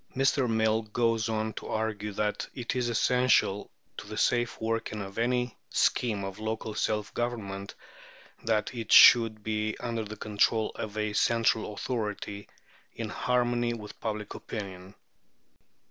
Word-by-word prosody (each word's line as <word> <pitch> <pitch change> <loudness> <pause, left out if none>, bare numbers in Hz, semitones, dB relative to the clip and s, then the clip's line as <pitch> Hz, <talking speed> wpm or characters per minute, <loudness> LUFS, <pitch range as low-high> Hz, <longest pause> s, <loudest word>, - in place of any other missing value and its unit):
" - - -27
Mr. 135 -1 +2
Mill 110 0 +2
goes 115 +1 0
on 110 0 -1
to - - -7
argue 105 -1 -2
that 105 +1 -1
it 120 -1 -3
is 125 -1 0
essential 120 -4 +2 0.3
to - - -8
the - - -7
safe 120 -1 +1
working 115 -1 -2
of 100 +1 -6
any 125 0 0
scheme 110 -5 +1
of 95 +1 -6
local 110 0 -3
self 105 -1 -1
government 100 -5 -4 0.7
that 110 0 0
it 115 -3 -5
should 115 -3 +8
be 110 0 -1
under 115 -2 -3
the 110 0 -8
control 110 +1 +1
of 110 0 -6
a 105 -1 -1
central 115 -1 +2
authority 105 -3 -4 0.5
in - - -4
harmony 120 -1 0
with 105 -2 -10
public 105 -2 -4
opinion. 95 -2 -7
110 Hz, 145 wpm, -29 LUFS, 105-120 Hz, 0.7 s, should